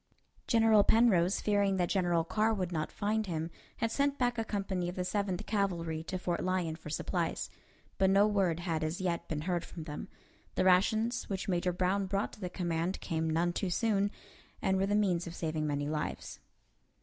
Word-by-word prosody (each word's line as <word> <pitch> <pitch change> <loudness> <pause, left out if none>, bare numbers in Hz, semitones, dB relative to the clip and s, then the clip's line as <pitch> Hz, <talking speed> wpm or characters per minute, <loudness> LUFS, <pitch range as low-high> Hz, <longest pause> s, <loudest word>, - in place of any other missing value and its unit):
General 225 -3 +5
Penrose, 200 -6 +4
fearing 200 -2 +2
that 175 -1 +2
General 175 -4 +2
Carr 215 +6 +1
would 185 -3 -2
not 155 -3 -2
find 215 +1 -1
him, 165 -1 -3 0.3
had 230 -1 0
sent 280 +2 +1
back 245 -1 +1
a - - +1
company 195 -4 -2
of 180 - -6
the 180 - -2
Seventh 190 -1 -1
Cavalry 170 -6 -1
to 185 - -3
Fort 175 -1 -2
Lyon 180 -3 0
for 160 - -10
supplies; 165 +2 -2 0.5
but 190 0 +4
no 200 +1 +5
word 190 -5 +1
had 165 -3 -1
as 155 +2 -2
yet 175 -2 -1
been 150 -2 -3
heard 175 +1 -1
from 165 - -8
them. 150 -2 -6 0.5
The - - +2
rations 220 +6 +3
which 195 -2 -3
Major 180 -1 +1
Brown 185 +2 0
brought 200 +1 -1
to - - -12
the 180 -3 -4
command 175 0 -2
came 160 -2 -1
none 170 +2 +1
too 190 - -1
soon, 205 +1 +1 0.5
and 190 - +1
were 195 - +2
the 205 - +1
means 180 -5 +1
of 170 - -7
saving 155 -2 -2
many 145 0 -1
lives. 150 0 -4
185 Hz, 195 wpm, -32 LUFS, 170-205 Hz, 0.5 s, General